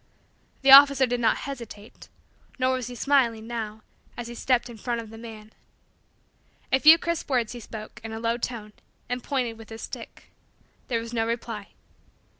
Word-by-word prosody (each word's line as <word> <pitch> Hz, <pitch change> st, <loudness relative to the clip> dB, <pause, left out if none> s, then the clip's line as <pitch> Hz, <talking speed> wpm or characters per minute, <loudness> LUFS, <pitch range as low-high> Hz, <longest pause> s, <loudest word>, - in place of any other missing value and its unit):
The 270 Hz, -, +6 dB
officer 275 Hz, -1 st, +9 dB
did 245 Hz, 0 st, -2 dB
not 230 Hz, -, +2 dB
hesitate; 235 Hz, -6 st, -9 dB, 0.5 s
nor 260 Hz, 0 st, +2 dB
was 255 Hz, -2 st, -3 dB
he 250 Hz, -, -8 dB
smiling, 240 Hz, -5 st, +2 dB
now, 220 Hz, -2 st, -5 dB, 0.3 s
as 240 Hz, -, -5 dB
he 240 Hz, -, -7 dB
stepped 245 Hz, +1 st, +1 dB
in 235 Hz, -2 st, -10 dB
front 240 Hz, 0 st, -2 dB
of 225 Hz, -2 st, -9 dB
the 225 Hz, -, -10 dB
man. 220 Hz, -2 st, -11 dB, 1.2 s
A 265 Hz, -, +4 dB
few 310 Hz, +4 st, +9 dB
crisp 335 Hz, -2 st, -3 dB
words 245 Hz, -5 st, +1 dB
he 240 Hz, -, -7 dB
spoke, 220 Hz, +1 st, -10 dB
in 225 Hz, -, -6 dB
a 225 Hz, -, -5 dB
low 230 Hz, +1 st, 0 dB
tone, 230 Hz, -3 st, -5 dB, 0.4 s
and 245 Hz, 0 st, -3 dB
pointed 245 Hz, -5 st, -2 dB
with 225 Hz, -, -12 dB
his 225 Hz, 0 st, -8 dB
stick. -, -, -10 dB, 0.6 s
There 235 Hz, -2 st, 0 dB
was 230 Hz, +1 st, -8 dB
no 225 Hz, -1 st, 0 dB
reply. 230 Hz, -3 st, -4 dB
235 Hz, 180 wpm, -26 LUFS, 225-255 Hz, 1.2 s, officer